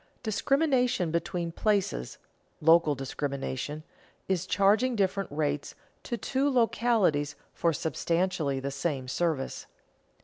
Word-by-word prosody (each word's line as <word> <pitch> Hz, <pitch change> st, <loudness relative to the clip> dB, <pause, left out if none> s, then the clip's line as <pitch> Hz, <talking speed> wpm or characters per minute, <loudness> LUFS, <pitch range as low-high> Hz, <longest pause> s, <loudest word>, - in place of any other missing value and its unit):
_Discrimination 250 Hz, -, +1 dB
between 170 Hz, 0 st, -2 dB
places 195 Hz, -, 0 dB, 0.4 s
(local 160 Hz, -1 st, +5 dB
discrimination) 140 Hz, +2 st, -4 dB, 0.4 s
is 190 Hz, -1 st, 0 dB
charging 210 Hz, +7 st, +3 dB
different 195 Hz, -3 st, 0 dB
rates 145 Hz, -1 st, -2 dB, 0.3 s
to 240 Hz, -, -4 dB
two 270 Hz, +4 st, 0 dB
localities 225 Hz, -, +2 dB, 0.2 s
for 170 Hz, -, +1 dB
substantially 165 Hz, -1 st, -1 dB
the 140 Hz, +1 st, -3 dB
same 135 Hz, -2 st, -2 dB
service. 155 Hz, -1 st, -2 dB
170 Hz, 100 wpm, -28 LUFS, 145-215 Hz, 0.4 s, local